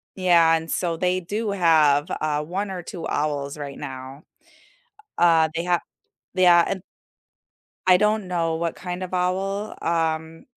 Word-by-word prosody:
yeah, 170 -3 +4
and 165 0 -4
so 170 -2 -1
they 180 +2 +1
do 205 +4 -3
have, 155 -6 +4 0.2
uh, 150 -1 0
1 190 +6 -3
or 180 -2 -6
2 170 0 -6
owls 145 -1 -2
right 140 -2 -7
now. 130 +2 -8 1.0
U - - +6
uh, 165 -2 +5
they 165 +1 -2
ha 175 -1 +2 0.6
Yeah, 175 -2 +6
and 190 - -3 1.1
I 185 -1 +7
don't 210 0 +1
know 165 -2 0
what 170 0 -2
kind 180 0 -6
of 185 0 -5
owl. 195 +3 -1
Um, 160 -1 -1
170 Hz, 155 wpm, -23 LUFS, 160-185 Hz, 1.1 s, I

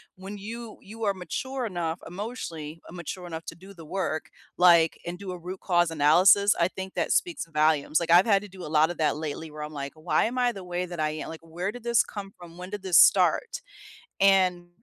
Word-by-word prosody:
when 195 +2 -8
you 225 +2 -8
you 225 +3 -9
are 200 - +2
mature 255 +9 -4
enough 175 -5 -3
emotionally 170 -6 -6
mature 180 +1 -7
enough 165 -1 -7
to 165 - -7
do 190 +4 -14
the 165 -3 -12
work, 160 -2 -3 0.3
like, 170 -2 +5
and 175 +1 -5
do 195 -1 -7
a 180 - -6
root 180 +2 -8
cause 175 -2 +2
analysis, 175 +7 +5
I 170 - +4
think 190 0 -7
that - - -1
speaks 350 - 0
volumes, 155 -1 +2
like, 170 -1 -2
I've 175 +2 +7
had 200 -3 +4
to - - -8
do 185 -1 -11
a - - -6
lot 155 +2 +3
of 175 - -8
that 155 -2 +1
lately 155 +1 -5
where 150 0 -8
I'm 150 +1 -7
like, 140 -1 -5
"Why 155 +2 +1
am 245 +3 -3
I 245 -1 +2
the 195 -5 -9
way 180 0 -3
that 175 -2 -8
I 155 0 0
am?" 155 - -6
Like, 160 - -8
"Where 170 +4 -4
did 245 +1 -11
this 235 -1 +3
come 200 -2 -8
from? 170 -1 -13
When 180 +1 -8
did 205 0 -6
this 185 -3 +3
start?" - - +4 0.6
And, 185 -3 +3
180 Hz, 230 wpm, -26 LUFS, 160-195 Hz, 0.6 s, I've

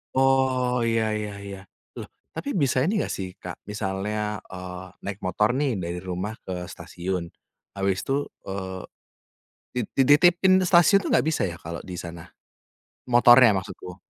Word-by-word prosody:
Oh, 130 -2 +2
iya 115 -1 +2
iya 105 -1 -4
iya. 100 -1 -7 0.4
Loh, - - -5 0.3
tapi 285 - -4
bisa 135 -2 +2
ini 190 - +1
enggak - - -3
sih 95 - -4
Kak, - - -7
misalnya, 105 +1 -2 0.2
eee, 90 0 -7 0.2
naik 100 -1 -4
motor 105 +3 +2
nih 145 -1 +1
dari 85 0 -4
rumah 95 +4 -3
ke 95 - -4 0.2
stasiun, 90 0 -4 0.5
habis 95 -1 0
itu, 135 - 0 0.3
eee, 95 -1 -5 0.9
di 125 - -1 0.3
dititipin 175 +6 +5
di - - +1
stasiun 175 +3 +6
tuh - - -4
enggak - - +3
bisa 160 - -1
ya 85 - -8
kalo 85 +1 -6
di 90 - -5
sana? 85 0 -7 0.9
Motornya 120 -1 +8
maksudku. 95 -1 -10
105 Hz, 155 wpm, -25 LUFS, 95-130 Hz, 0.9 s, Motornya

